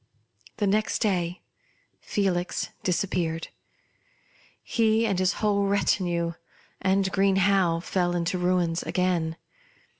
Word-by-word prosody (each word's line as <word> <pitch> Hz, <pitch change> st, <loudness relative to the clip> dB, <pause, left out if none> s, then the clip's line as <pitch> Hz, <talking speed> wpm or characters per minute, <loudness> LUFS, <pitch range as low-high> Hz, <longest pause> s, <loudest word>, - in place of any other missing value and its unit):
The 210 Hz, -, 0 dB
next 205 Hz, 0 st, +1 dB
day 180 Hz, -5 st, -1 dB, 0.6 s
Felix 185 Hz, -3 st, -1 dB
disappeared; 170 Hz, -3 st, -1 dB, 1.1 s
he 225 Hz, -1 st, +2 dB
and 195 Hz, -4 st, 0 dB
his 185 Hz, +1 st, +2 dB
whole 200 Hz, -2 st, +1 dB
retinue; 175 Hz, -4 st, +1 dB, 0.5 s
and 190 Hz, 0 st, +2 dB
Green 195 Hz, 0 st, +3 dB
Howe 190 Hz, -4 st, +3 dB
fell 175 Hz, -1 st, 0 dB
into 175 Hz, +1 st, -1 dB
ruins 175 Hz, -2 st, +1 dB
again. 175 Hz, -3 st, -1 dB
185 Hz, 100 wpm, -26 LUFS, 175-200 Hz, 1.1 s, Green